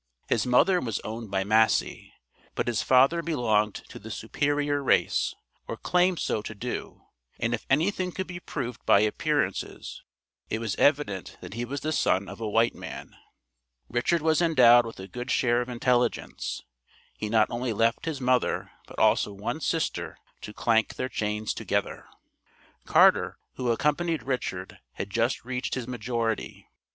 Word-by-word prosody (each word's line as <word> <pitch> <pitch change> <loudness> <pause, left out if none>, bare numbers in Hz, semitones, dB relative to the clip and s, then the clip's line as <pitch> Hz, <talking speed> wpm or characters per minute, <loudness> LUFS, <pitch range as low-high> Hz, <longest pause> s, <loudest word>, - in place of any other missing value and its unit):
His - - +1
mother 175 +9 +4
was 115 -7 -2
owned 110 0 -6
by 95 0 0
Massey, 110 +2 +2 0.4
but - - -1
his 120 -3 0
father 135 +6 +4
belonged 110 -10 +1
to - - -10
the 110 - -10
"superior 145 +6 -1
race" 135 - +2 0.3
or - - -5
claimed 180 0 +2
so 110 - -1
to 110 - -7
do, 120 +4 -6 0.4
and 115 0 0
if 120 - -4
anything 180 +6 +1
could 190 +2 -4
be 180 -1 -7
proved 125 -8 -5
by 100 - +6
appearances 110 0 -1 0.5
it - - -1
was 110 -3 -2
evident 140 - +1
that - - -9
he 120 +2 -3
was 140 +3 -5
the 155 - -2
son 100 -9 +1
of 115 - -9
a 110 - -2
white 115 +2 +3
man. - - -9 0.7
Richard 150 +7 +1
was 160 0 +3
endowed 120 -8 +6
with 115 - -9
a 95 - -7
good 120 +6 -7
share 120 -1 +2
of 125 - -5
intelligence. 125 0 -1 0.5
He 105 - -4
not 110 -1 +3
only 120 +1 -2
left 115 +2 +1
his 160 -4 -3
mother 125 -1 +1 0.2
but - - -13
also - - +3
one 105 +10 -4
sister 165 +1 -2 0.2
to - - -7
clank 110 0 +1
their 130 - -3
chains 105 -2 -2
together. - - -2 0.8
Carter, - - +4 0.2
who 125 -2 -2
accompanied 150 +4 0
Richard, 115 -8 -4
had 100 - -6
just 115 +3 0
reached 125 0 -3
his 125 -2 -4
majority. 115 -2 -3
120 Hz, 160 wpm, -27 LUFS, 110-145 Hz, 0.8 s, by